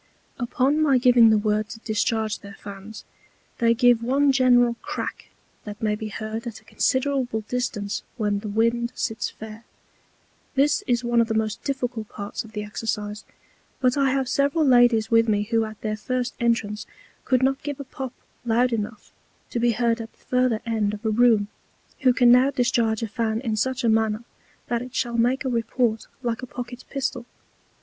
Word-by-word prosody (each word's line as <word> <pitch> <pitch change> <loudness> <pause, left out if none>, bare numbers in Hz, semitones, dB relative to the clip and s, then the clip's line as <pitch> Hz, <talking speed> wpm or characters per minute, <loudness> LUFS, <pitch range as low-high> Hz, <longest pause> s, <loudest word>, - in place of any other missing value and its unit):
Upon 265 +5 +1
my 280 -4 +4
giving 245 -2 +6
the 220 - +5
Word 210 0 0
to 225 - -8
discharge 220 0 -1
their 200 0 -11
Fans, 200 +2 -9 0.5
they 230 0 +4
give 245 -1 +4
one 275 +4 +3
general 245 -2 +4
Crack - - -5 0.4
that 210 -1 -8
may 215 -1 0
be 215 +1 -4
heard 220 +2 -5
at 225 -2 -7
a - - -26
considerable 260 -1 0
distance 215 -3 -3 0.2
when 205 -3 0
the 215 - -7
Wind 230 +3 +1
sits 225 -4 -2
fair. 220 +1 -10 0.9
This 280 +2 +3
is 245 -1 +1
one 240 -1 +3
of 230 - +1
the 220 - -2
most 215 -1 -1
difficult 245 -5 -3
parts 205 -1 -5
of 225 -1 -15
the 210 -1 -3
Exercise; 210 0 -4 0.5
but 255 -1 +2
I 275 -2 +2
have 265 0 0
several 280 +4 +2
ladies 245 -4 +4
with 230 0 +4
me 205 -1 +2
who 225 +1 +1
at 215 -1 -9
their 215 -1 -2
first 250 +2 -2
Entrance 225 -3 0 0.4
could 255 -1 +2
not 270 +1 +1
give 290 -1 -5
a - - -4
Pop 265 -1 -6 0.3
loud 240 +1 +2
enough 215 -1 -4 0.4
to 235 - -1
be 240 0 +3
heard 235 0 +1
at 225 - -8
the - - -30
further 250 -3 +1
end 215 -3 0
of 210 +2 -13
a 220 - +2
Room, 225 -2 +4 0.5
who 260 -2 +4
can 245 -1 +5
now 250 +2 +6
discharge 240 -4 +1
a - - -1
Fan 220 0 -1
in 225 -4 -1
such 260 +4 -1
a - - +2
manner 220 0 +1 0.4
that 235 -1 -1
it 250 0 -9
shall 235 -2 -1
make 250 +4 +1
a - - +1
Report 230 -1 0 0.2
like 235 -1 -2
a 255 - -6
Pocket 245 0 -7
Pistol. 265 -3 -3
235 Hz, 190 wpm, -24 LUFS, 220-250 Hz, 0.9 s, giving